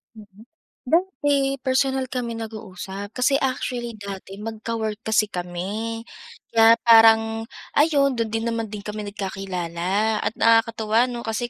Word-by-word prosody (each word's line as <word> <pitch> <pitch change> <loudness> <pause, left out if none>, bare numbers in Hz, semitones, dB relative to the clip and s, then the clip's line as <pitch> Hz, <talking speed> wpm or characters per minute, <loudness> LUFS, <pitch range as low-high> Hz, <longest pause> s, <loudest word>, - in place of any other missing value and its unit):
Mm. 210 +1 -15 0.4
Dati 285 -4 +1
personal 265 0 +1
kami 235 -2 -4
nag-uusap, 205 -2 -7
kasi 255 +2 +3
actually 245 -3 -2
dati 195 -1 -8
magka-work 220 0 -4
kasi 220 -1 +2
kami. 200 +6 -4 0.5
Kaya 225 0 +7
parang, 225 0 +6 0.3
ayun 285 -3 +3
do'n 230 -1 -1
din 225 0 -2
naman 230 -1 -2
din 205 -1 -8
kami 210 0 -5
nagkakilala 195 +1 -2
at - - 0
nakakatuwa, 225 +1 +3
'no, 240 -1 -6
kasi 230 +2 -2
225 Hz, 125 wpm, -23 LUFS, 205-240 Hz, 0.5 s, Kaya